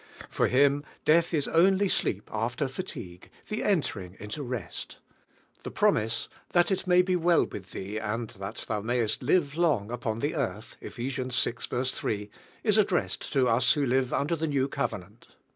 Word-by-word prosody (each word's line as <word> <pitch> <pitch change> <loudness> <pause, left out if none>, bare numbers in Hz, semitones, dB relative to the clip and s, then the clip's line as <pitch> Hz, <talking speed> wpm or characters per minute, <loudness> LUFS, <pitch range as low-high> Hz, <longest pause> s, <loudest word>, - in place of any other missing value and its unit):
For - - +1
him 140 +2 +3 0.2
death 165 +2 +4
is 150 -5 0
only 190 +4 +4
sleep 105 - 0
rf 115 +3 -1
ter 145 - 0
fatigue, 115 - -7 0.2
the 215 - -2
entering 100 - -1
into 105 +8 -5
rest. 125 - -5 0.6
The - - -6
promise, 115 +1 +1 0.3
"That 175 +2 +4
it 190 0 -1
may 180 0 +6
be 185 0 +1
well 170 -1 +4
with 95 -1 -9
thee, 100 +3 -5
and 110 +2 -2
thai 95 - -17 0.3
thou 105 - -1
niaycK 115 0 0
l 125 - -7
live 150 -3 +3
long 145 -11 +1
upon 120 -2 -2
the 145 +6 -1
earth" 110 - -3
(Eph. - - -8
vi. 125 +2 -3 0.7
3) 105 -5 -2 0.3
is 215 -1 +4
addressed 200 -4 0
to 135 -3 +3
us 115 +2 +4
who 145 -3 +1
live 130 0 +1
under 155 +4 +1
the 160 0 -2
New 140 -2 +1
Covenant. 110 -6 -4
130 Hz, 175 wpm, -28 LUFS, 110-165 Hz, 0.7 s, may